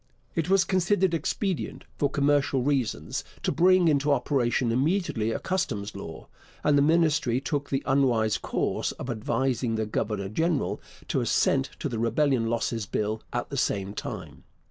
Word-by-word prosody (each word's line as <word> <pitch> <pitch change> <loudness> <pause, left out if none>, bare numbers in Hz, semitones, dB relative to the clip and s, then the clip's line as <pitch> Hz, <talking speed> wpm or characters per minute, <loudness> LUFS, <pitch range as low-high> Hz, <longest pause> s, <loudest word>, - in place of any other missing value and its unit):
It 165 +1 -1
was 195 -1 +5
considered 185 0 +2
expedient, 185 +2 -2 0.2
for 145 - +2
commercial 140 -2 +2
reasons, 125 - -1 0.2
to - - +1
bring 180 +1 +4
into 145 -1 +2
operation 125 -3 +1
immediately 135 - +1
a - - -1
customs 110 - -2
law, 80 -5 -8 0.4
and 150 -1 +4
the 140 - +5
Ministry 150 -5 +3
took 145 +1 -3
the 135 0 -1
unwise 125 -6 +2
course - - -1
of 125 - -5
advising 120 +1 -1
the 110 0 -1
governor 105 -2 -2
general 160 - -1 0.3
to - - +1
assent 65 - +2
to - - -3
the 115 - -3
Rebellion 120 +1 +2
Losses 115 -2 -1
Bill 110 +2 -2
at - - -3
the - - -3
same 100 0 -1
time. - - -7
135 Hz, 155 wpm, -27 LUFS, 110-155 Hz, 0.4 s, was